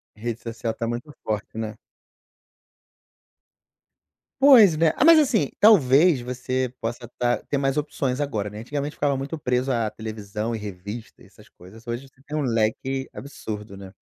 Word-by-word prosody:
Rede 115 +1 -4
social 115 -1 -4
tá 115 0 -4
muito 120 +5 -4
forte, 110 0 -4
né? 110 -1 -4 2.7
Pois 245 - +8
é, 165 - +6
ah, - - +3
mas, 330 -1 +9
assim, 225 - +2
talvez 160 - +6
você 125 0 -3
possa 120 +1 -4
tá 120 0 +1
ter 140 - -2
mais 135 0 0
opções 140 -3 -1
agora, 110 -8 -2
né, 105 - -9
antigamente 145 +5 -4
ficava 145 -1 +1
muito 140 +5 -4
preso 125 0 0
à 115 -3 0
televisão 110 0 -5
e - - -3
revista 105 +3 -8
e - - -15
essas - - -19
coisas, 110 +7 -16
hoje 120 +3 -4
você 135 0 -26
tem 150 +2 -6
um - - 0
leque 130 +2 -1
absurdo, 105 -7 -7
né? 95 -1 -11
125 Hz, 160 wpm, -24 LUFS, 110-140 Hz, 2.7 s, mas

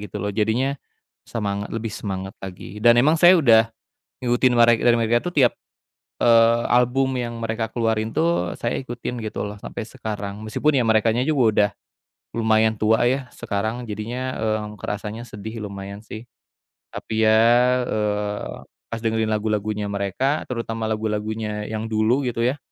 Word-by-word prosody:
gitu 105 -1 -7
loh. 105 +1 -2
Jadinya 110 +6 +1 0.6
semangat 100 -3 -3
lebih 115 -1 -3
semangat 95 -2 -5
lagi 95 +2 -8
dan 120 0 +6
emang 140 +6 +5
saya 175 +2 +8
udah 115 -7 +5 0.5
ngikutin 125 0 +2
mere 120 0 +6
dari 120 -1 +4
mereka 115 +1 +2
tuh 175 - -4
tiap, 130 -4 +4 0.7
eee, 115 0 +5
album 130 +2 +2
yang 120 -1 -4
mereka 115 0 -2
keluarin 110 -1 0
tuh 160 - +1
saya 115 - -2
ikutin 120 -1 -5
gitu 110 - -4
loh 105 0 -6
sampai - - -6
sekarang. 105 -5 -6
Meskipun 145 +7 +1
ya - - +2
merekanya 110 +2 +3
juga 145 -5 +2
udah 105 0 +3 0.7
lumayan 110 -1 +3
tua 110 +2 +3
ya 130 0 -1
sekarang. 110 +4 -3
Jadinya, 120 +5 -4
eee, 110 -1 0 0.2
kerasanya 105 +2 -5
sedih 110 +2 -7
lumayan 100 0 -7
sih, 110 +1 -8 0.7
tapi 110 0 -2
ya, 110 0 +5 0.5
eee, 105 -1 -2 0.3
pas 115 - -3
dengerin 110 -1 0
lagu-lagunya 105 -1 -1
mereka 100 +9 -1
terutama 115 -2 -3
lagu-lagunya 105 0 -2
yang 110 0 -3
dulu 110 +5 +2
gitu 115 -1 -1
ya, 130 +4 +1
110 Hz, 150 wpm, -22 LUFS, 105-120 Hz, 0.7 s, saya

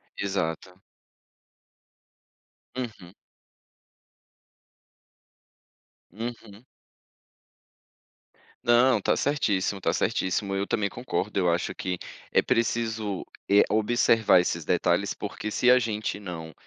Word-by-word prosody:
Exato. 90 -1 -3 2.0
Uhum. 110 -8 -6 3.0
Uhum. 115 0 -8 2.0
Não, 120 0 +4
tá - - +1
certíssimo, 105 -9 0
tá - - 0
certíssimo. 100 +2 0
Eu 100 +1 -1
também 100 -2 0
concordo, 105 -4 -3
eu 90 -2 +2
acho 85 +1 -1
que 90 -1 -3 0.3
é - - +4
preciso, 110 -3 -1 0.2
eh, 100 +1 +6
observar 110 -3 +4
esses 85 -2 -3
detalhes, 90 +3 +1
porque 105 +1 -5
se 125 +4 +2
a 125 - +6
gente 110 -3 -3
não 85 -5 -7
100 Hz, 90 wpm, -26 LUFS, 95-115 Hz, 3.0 s, eh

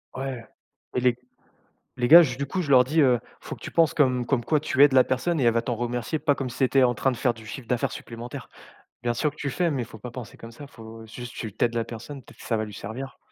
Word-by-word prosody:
Ouais, 130 -3 -5 0.5
et - - +2
les 125 -1 +3 0.8
les 120 -1 0
gars 170 +2 +11
ju 125 -5 -2
du 140 +1 -3
coup, 185 +7 -2
je 155 - -5
leur 125 -1 +7
dis, 150 +6 0
heu: 125 -4 +4 0.2
«Faut - - -7
que - - -21
tu - - -7
penses 165 -2 +3
comme 130 -4 +2
comme 120 -1 0
quoi 155 +5 +2
tu 140 -2 +3
aides 145 - +6
la 130 -1 +6
personne 150 +5 -1
et - - +1
elle 115 -1 +4
va 115 - +1
t'en 120 +1 -2
remercier 120 +5 -2
pas 145 -1 +2
comme 130 -2 -4
si 120 - -9
c'était 135 0 +3
en 120 -1 +3
train 130 +4 +1
de - - -4
faire 125 -4 +1
du 110 -1 -14
chiffre 120 +2 -8
d'affaires 125 -1 0
supplémentaire. 120 +1 -8 0.5
Bien 120 0 +1
sûr 150 +6 0
que - - -22
tu 140 -2 -3
fais, 175 +6 0
mais 135 -4 -1
il - - -8
faut - - -12
pas 125 - -8
penser 120 -2 -9
comme 115 - -11
ça, 140 +5 -11
faut 115 -3 -12
juste 120 +2 -9
tu 110 -4 -6
tu - - +1
aides 120 0 -3
la 115 - +1
personne, 120 +4 -9
peut-être - - -18
ça 115 - -1
va 110 - -1
lui 105 - -10
servir». 120 +7 -7
125 Hz, 290 wpm, -25 LUFS, 115-140 Hz, 0.8 s, gars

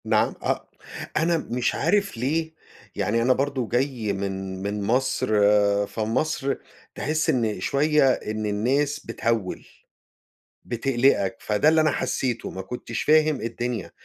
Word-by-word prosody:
نعم - - +2
أ - - +2 0.6
أنا 165 +2 +2
مش 125 -5 -1
عارف 200 - +1
ليه، 160 +6 -1 0.4
يعني 105 +3 0
أنا 125 +2 +4
برضه 135 -3 -1
جاي 120 -4 0
من 95 -1 -4
من 100 0 -2
مصر، 125 +6 +1 0.6
فمصر 130 +6 -1 0.4
تحس 155 +1 -1
إن 110 -6 +1
شوية 140 +5 +3
إن 110 0 -4
الناس 135 +8 0
بتهوّل، 115 -4 -2 1.0
بتقلقك 120 -4 +1
فده 105 +8 +2
اللي 160 0 +5
أنا 155 0 +3
حسّيته 125 -3 -2
ما 95 - -6
كنتش 115 +3 -5
فاهم 155 -2 +3
الدنيا، 115 -2 -3
125 Hz, 125 wpm, -24 LUFS, 110-145 Hz, 1.0 s, اللي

